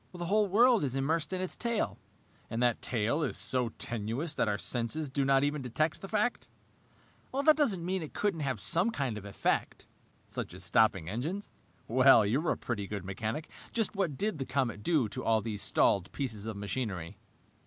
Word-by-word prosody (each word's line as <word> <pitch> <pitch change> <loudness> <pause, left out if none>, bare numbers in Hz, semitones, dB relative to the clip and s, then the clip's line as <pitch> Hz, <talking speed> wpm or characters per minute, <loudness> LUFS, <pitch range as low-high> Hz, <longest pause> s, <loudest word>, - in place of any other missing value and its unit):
"The 175 -1 -4
whole 210 +3 +3
world 230 +2 +5
is 135 -2 -1
immersed 155 +5 0
in 185 -1 -2
its 185 - -2
tail." 235 -2 -2 0.5
"And 115 - -3
that 120 -2 +2
tail 120 +6 0
is 145 - -1
so 125 -2 +1
tenuous 120 +8 -3
that - - 0
our 105 -1 0
senses 130 +7 -1
do 140 +1 0
not 135 0 +4
even 145 0 0
detect 155 +6 -1
the 195 - -6
fact!" 215 +4 0 0.8
"That 280 +3 +4
doesn't 210 - +1
mean 185 +1 -1
it 155 - -8
couldn't 200 -5 0
have 135 -6 -2
some 170 - +3
kind 140 - -2
of 105 -1 -8
effect." 100 - -1 0.4
"Such - - -5
as - - -3
stopping 100 -7 +3
engines? 150 - -4 0.4
Well, 130 -2 +6
you're 135 +11 +1
a - - +1
pretty 105 -5 -3
good 100 -2 -5
mechanic. 110 - -4 0.3
Just 225 -3 0
what 175 -9 -1
did 205 -3 -1
the 135 - -2
comet 130 -6 -1
do 145 -2 +2
to 100 - -6
all 110 -1 +3
these 105 -1 -4
stalled 95 -1 +2
pieces 110 -7 -4
of 110 -3 -4
machinery?" 100 -5 -4
135 Hz, 190 wpm, -31 LUFS, 110-175 Hz, 0.8 s, Well